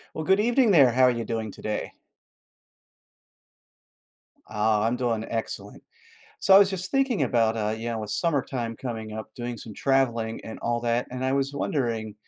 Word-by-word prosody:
Well, 160 - -3
good 190 +4 +3
evening, 235 +1 +3
there. 140 -8 +6
How 130 +2 +3
are 125 - +6
you 120 -1 -3
doing 110 -2 -3
today? 105 - -4 2.5
Ah, 105 0 +1
I'm 115 +2 +1
doing 115 -3 -1
excellent. 115 -2 -5 0.6
So, 190 - +5
I - - +11
was 200 -1 +5
just 190 -1 -4
thinking 270 -5 +1
about, 115 -2 +2
uh 105 -1 -1
yeah 115 0 -3
with, 105 -1 -5
summertime 125 -3 -1
coming 110 -3 -6
up, 110 0 -7
doing 120 -1 -5
some 110 -1 -10
traveling 120 -4 0
and 110 - -8
all 120 0 -1
that, 120 +1 0
and 125 +1 -4
I 130 - +1
was 135 0 0
wondering, 115 - -2
120 Hz, 170 wpm, -26 LUFS, 110-140 Hz, 2.5 s, I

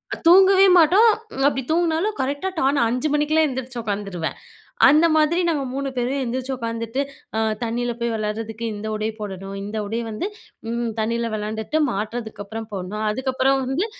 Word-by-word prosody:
அ - - -12
தூங்கவே 380 +2 +7
மாட்டோம், 365 +8 +6 0.3
ம் 270 - -1
அப்படி 270 -2 0
தூங்குனாலும், 340 +5 +1
கரெக்ட்டா 285 +8 -1
டான்ன்னு 275 0 +2
5 250 +6 0
மணிக்கெல்லாம் 305 +1 +3
எந்திரிச்சு 260 -2 -5
உட்காந்துருவேன். 200 -6 -3 0.5
அந்த 305 +4 +6
மாதிரி 315 +3 +3
நாங்க 300 -5 0
3 275 0 -2
பேரும் 260 +3 -1
எந்திரிச்சு 255 +2 -3
உக்காந்துட்டு, 230 +1 -3 0.4
அ 220 - +1 0.2
தண்ணியில 240 +1 -2
போய் 235 -1 0
விளையாடுறதுக்கு 220 +1 -4
இந்த 210 +1 -5
உடை 215 +1 -1
போடணும், 195 -1 -6
இந்த 210 +2 -5
உடை 225 +3 -2
வந்து 220 - -3 0.4
ம் 235 0 -1
தண்ணீல 230 +1 -1
வெளாண்டுட்டு 220 +8 -2
மாத்துறதுக்கு 220 0 -4
அப்பறம் 220 +1 -7
போடணும், 195 +3 -4
அதுக்கப்புறம் 260 +3 +1
வந்து 280 +11 0
245 Hz, 160 wpm, -22 LUFS, 220-295 Hz, 0.5 s, தூங்கவே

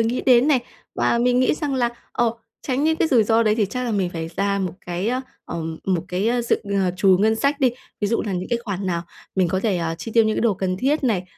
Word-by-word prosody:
nghĩ 230 +2 0
đến 255 +2 +5
này. 265 -5 +4 0.3
Và 235 - +1
mình 245 +1 +3
nghĩ 255 - +3
rằng 295 -3 -2
là, 245 -2 +2 0.2
ờ, 235 -2 +1 0.3
tránh 270 +2 -1
những 320 0 +2
cái 320 - +1
rủi 245 -7 +5
ro 225 +1 +3
đấy 215 -2 +3
thì 215 -2 +1
chắc 250 +5 -4
là 240 - -2
mình 190 -4 0
phải 165 -1 -5
ra 200 0 +1
một 185 -4 -2
cái 180 +4 -2
á, 255 +2 0 0.2
ờ, 170 - -5 0.2
một 180 -3 0
cái, 185 +5 0
ơ, 240 0 +1
dự, 235 - +2 0.3
ờ, 180 - +1
trù 190 -1 +5
ngân 220 +2 +3
sách 280 +3 0
đi, 255 - +4 0.3
ví 205 - +1
dụ 230 - 0
là 205 - -3
những 180 0 -3
cái 235 - 0
khoản 200 -2 -3
nào 170 -2 -1 0.3
mình 185 -3 +2
có 190 +2 0
thể, 205 -4 +1
à, 165 -1 -2
chi 175 +7 -7
tiêu 230 -1 +6
những 220 - 0
cái - - 0
đồ 230 -4 +2
cần 185 0 -2
thiết 275 +7 0
này, 200 -8 +1
220 Hz, 280 wpm, -22 LUFS, 185-250 Hz, 0.3 s, tiêu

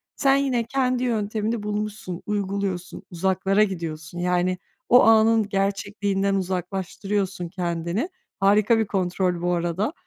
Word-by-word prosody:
sen 275 -1 +3
yine 265 -4 +1
kendi 255 0 0
yöntemini 220 -1 -1
bulmuşsun, 210 -3 -4
uyguluyorsun, 195 -3 -3
uzaklara 190 +3 +2
gidiyorsun. 170 -3 -4
Yani, 180 +1 +1 0.3
o 245 - +7
anın 220 -1 +5
gerçekliğinden 195 0 0
uzaklaştırıyorsun 190 +1 -2
kendini. 175 - -2 0.3
Harika 210 +3 +4
bir 220 - +1
kontrol 180 -2 0
bu 175 0 +1
arada. 175 - -1
195 Hz, 115 wpm, -24 LUFS, 180-215 Hz, 0.3 s, o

